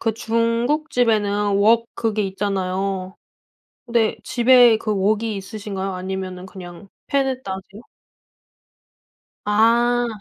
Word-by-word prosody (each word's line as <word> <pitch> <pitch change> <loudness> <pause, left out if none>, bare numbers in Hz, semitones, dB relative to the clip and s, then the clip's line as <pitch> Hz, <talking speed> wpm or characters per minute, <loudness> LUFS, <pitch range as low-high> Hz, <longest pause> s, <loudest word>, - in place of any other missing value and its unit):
그 225 -2 -1
중국집에는 230 -3 0
웍 225 +3 +4
그게 220 -2 -1
있잖아요. 190 -1 -3 0.7
네 235 -2 +1
집에 245 -1 +5
그 215 - -4
웍이 210 +2 0
있으신가요? 195 -1 -5
아니면은 185 0 -5
그냥 185 0 -11 0.2
팬에다 265 -6 -1
하세요? 190 +3 -9 1.6
아. 235 +3 +3
210 Hz, 220 characters per minute, -21 LUFS, 195-235 Hz, 1.6 s, 집에